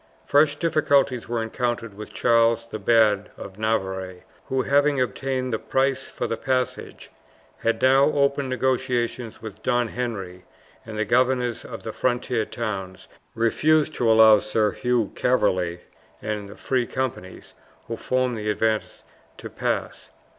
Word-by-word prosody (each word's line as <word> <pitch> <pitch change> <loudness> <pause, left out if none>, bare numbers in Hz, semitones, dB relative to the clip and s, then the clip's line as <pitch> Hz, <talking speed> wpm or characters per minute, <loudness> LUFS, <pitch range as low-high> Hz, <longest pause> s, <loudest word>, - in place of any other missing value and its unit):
Fresh 145 0 +4
difficulties 145 -6 +1
were 120 -1 -1
encountered 115 -1 -3
with 105 +1 -9
Charles 115 -1 +2
the 110 -2 -6
Bad, 105 -1 +3
of 95 +1 -10
Navarre, 95 -4 -2 0.2
who, 130 -1 -1
having 145 0 +2
obtained 130 +2 -2
the 110 - 0
price 135 0 0
for - - -4
the 115 - -2
passage, 130 -2 -3 0.5
had 115 - -1
now 135 +1 +6
opened 140 -2 +1
negotiations 125 -2 -1
with 110 -3 -9
Don 120 -1 +1
Henry, 100 -8 -5 0.4
and 110 -1 -6
the 110 - 0
governors 125 +1 +1
of - - -9
the - - -5
frontier 120 -2 0
towns 95 -6 -5 0.3
refused 150 +7 +2
to 115 -5 +2
allow 110 -1 +7
Sir 105 0 0
Hugh 120 -4 0
Calverley 90 -8 +1 0.4
and 105 -1 -4
the 100 - -12
free 125 -3 -1
companies, 120 -8 -5 0.3
who 115 - -3
formed 125 0 -1
the 105 0 -3
advance, 110 0 -1 0.3
to - - -9
pass. - - -3
115 Hz, 140 wpm, -24 LUFS, 110-130 Hz, 0.5 s, allow